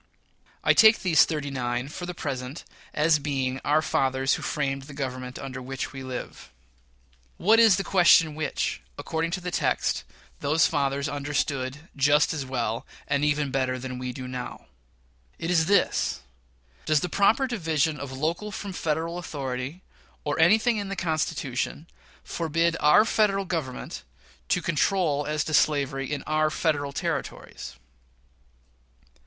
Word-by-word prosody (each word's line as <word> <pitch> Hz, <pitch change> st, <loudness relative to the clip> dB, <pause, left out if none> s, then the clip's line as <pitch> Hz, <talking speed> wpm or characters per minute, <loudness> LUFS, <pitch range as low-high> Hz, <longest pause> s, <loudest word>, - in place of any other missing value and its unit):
I -, -, +5 dB
take 220 Hz, 0 st, +7 dB
these 170 Hz, -5 st, +6 dB
"thirty 150 Hz, -3 st, -3 dB
nine," 125 Hz, -1 st, -2 dB
for 175 Hz, +4 st, -7 dB
the 180 Hz, -, -5 dB
present, 135 Hz, -1 st, -5 dB, 0.3 s
as 150 Hz, 0 st, +3 dB
being 135 Hz, -3 st, -2 dB
our 155 Hz, +2 st, +2 dB
"fathers 135 Hz, -2 st, +1 dB
who -, -, -2 dB
framed 135 Hz, -2 st, -2 dB
the 145 Hz, -, -9 dB
Government 130 Hz, -2 st, -5 dB
under 135 Hz, -1 st, -6 dB
which 135 Hz, +2 st, -5 dB
we 135 Hz, -, -7 dB
live." 130 Hz, -, -7 dB, 0.9 s
What 220 Hz, +5 st, +4 dB
is 225 Hz, -4 st, +7 dB
the 195 Hz, -, -1 dB
question 170 Hz, -5 st, +5 dB
which, 155 Hz, +1 st, -2 dB, 0.2 s
according 165 Hz, +1 st, -2 dB
to 180 Hz, +2 st, -3 dB
the 180 Hz, 0 st, -4 dB
text, -, -, 0 dB, 0.4 s
those 150 Hz, +3 st, +3 dB
fathers 140 Hz, -1 st, 0 dB
understood 145 Hz, 0 st, -2 dB
"just 145 Hz, +2 st, +3 dB
as 140 Hz, -4 st, -4 dB
well, 115 Hz, -3 st, -2 dB, 0.2 s
and 140 Hz, +1 st, +1 dB
even 150 Hz, -2 st, +1 dB
better 130 Hz, -1 st, 0 dB
than 130 Hz, 0 st, -6 dB
we 125 Hz, 0 st, -3 dB
do 130 Hz, +1 st, -7 dB
now"? 125 Hz, -1 st, -6 dB, 0.7 s
It 165 Hz, -, -3 dB
is 160 Hz, -2 st, +3 dB
this: 200 Hz, +1 st, +2 dB, 0.7 s
Does 155 Hz, -2 st, +3 dB
the -, -, -1 dB
proper 200 Hz, +9 st, +3 dB
division 160 Hz, -, 0 dB
of 140 Hz, -1 st, -6 dB
local 165 Hz, +10 st, -2 dB
from 200 Hz, -1 st, -6 dB
Federal 165 Hz, +1 st, -2 dB
authority, 140 Hz, 0 st, -5 dB, 0.4 s
or -, -, -2 dB
anything 220 Hz, +7 st, +4 dB
in 200 Hz, -2 st, -3 dB
the 195 Hz, -, -3 dB
Constitution, 155 Hz, -4 st, -2 dB, 0.4 s
forbid 165 Hz, 0 st, 0 dB
our 150 Hz, +9 st, +6 dB
Federal 200 Hz, -3 st, +2 dB
Government 160 Hz, -8 st, -4 dB, 0.5 s
to -, -, +1 dB
control 155 Hz, -3 st, +1 dB
as 150 Hz, -1 st, 0 dB
to 155 Hz, -, -5 dB
slavery 140 Hz, -3 st, +1 dB
in 145 Hz, -2 st, -3 dB
our 155 Hz, 0 st, +1 dB
Federal 150 Hz, -3 st, 0 dB
Territories? -, -, -4 dB
150 Hz, 150 wpm, -26 LUFS, 135-170 Hz, 0.9 s, take